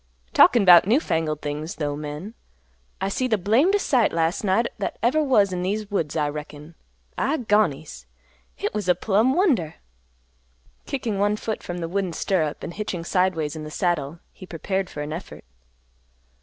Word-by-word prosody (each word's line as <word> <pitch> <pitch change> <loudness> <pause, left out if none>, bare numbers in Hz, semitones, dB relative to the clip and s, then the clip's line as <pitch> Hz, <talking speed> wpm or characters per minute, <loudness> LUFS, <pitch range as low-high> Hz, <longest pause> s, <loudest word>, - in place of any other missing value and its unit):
"Talkin' 235 -5 +6
'bout 175 0 +8
new 235 +7 +4
fangled 160 - -2
things, 150 +2 -4
though, 145 -2 -2
men! 150 +8 -7 0.7
I 195 - -1
seed 255 +6 -1
the 220 - +2
blamdest 270 - +2
sight 245 -6 +3
las' 165 +7 0
night 205 +4 +2
that - - -3
ever 270 +7 +3
was 210 -9 +3
in 180 - -2
these 205 +3 -3
woods, 165 -7 -1
I 150 -1 +1
reckon. 150 +1 -8 0.5
I 280 +6 +1
gonies! 165 - 0 0.5
Hit - - -3
was 205 -3 -3
a 180 - +5
plumb 220 +8 +2
wonder!" 260 - +1 1.1
Kicking 230 -7 -3
one 205 +1 +2
foot 220 0 -4
from 175 - -6
the 170 -1 -3
wooden 185 0 -2
stirrup 160 -4 -1
and 170 - -5
hitching 190 -4 -4
sideways 170 -4 0
in 155 - -6
the 155 - -7
saddle, 165 -3 -1 0.2
he 185 - -12
prepared 190 +3 -3
for 150 - -6
an 150 +1 -5
effort. 170 +3 -9
185 Hz, 170 wpm, -23 LUFS, 155-215 Hz, 1.1 s, bout